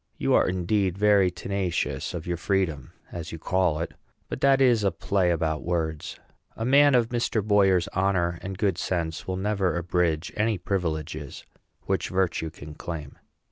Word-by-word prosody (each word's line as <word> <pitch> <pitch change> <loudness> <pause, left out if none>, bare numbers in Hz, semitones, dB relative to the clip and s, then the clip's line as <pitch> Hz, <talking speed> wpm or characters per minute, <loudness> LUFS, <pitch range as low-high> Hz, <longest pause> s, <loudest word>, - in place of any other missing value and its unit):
You - - +1
are - - +4
indeed 95 +1 0
very 100 -2 +4
tenacious 90 -5 -2
of 80 - -5
your 90 - -1
freedom, 85 -7 -1 0.2
as 85 -1 -6
you 80 - -6
call 90 -1 +1
it; 85 - -4 0.4
but - - -5
that 135 -1 +5
is 120 -5 +4
a 100 - +4
play 90 +2 0
about 80 -3 0
words. 80 -3 -2 0.4
A 115 - -2
man 140 +2 +6
of 120 -2 +3
Mr. 120 -3 0
Boyer's 95 -4 +4
honor 90 -3 0
and 95 0 -6
good 95 -4 0
sense 80 -3 -2
will 95 0 -2
never 95 -3 0
abridge 85 -2 0
any 105 0 +1
privileges 80 -5 -3 0.4
which - - -1
virtue 90 -3 0
can 75 -1 -11
claim. 75 -3 -7
90 Hz, 165 wpm, -26 LUFS, 80-100 Hz, 0.4 s, man